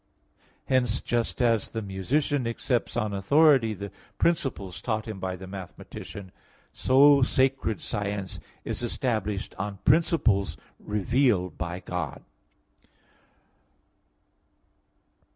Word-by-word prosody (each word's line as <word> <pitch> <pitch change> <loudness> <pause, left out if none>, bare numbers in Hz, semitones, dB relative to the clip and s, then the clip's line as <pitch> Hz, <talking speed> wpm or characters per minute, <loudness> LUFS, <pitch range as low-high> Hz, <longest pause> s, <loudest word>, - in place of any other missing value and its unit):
Hence, 125 -3 +2
just 120 +1 -1
as 115 -3 +2
the 110 - -4
musician 120 +8 0
accepts 120 +1 -1
on 105 -1 0
authority 130 +2 +4
the 100 +1 -7 0.3
principles 130 - 0
taught 110 -2 -2
him 110 -3 -5
by 95 0 -3
the 95 +1 -9
mathematician, 95 0 -9 0.4
so 140 +2 +6
sacred 130 -3 +1
science 100 -2 -3 0.3
is - - -3
established 110 -4 -2
on 100 0 -3
principles 140 - +3 0.2
revealed 105 - +1
by 90 +1 -4
God. 90 -3 -4
110 Hz, 100 wpm, -27 LUFS, 95-130 Hz, 0.4 s, so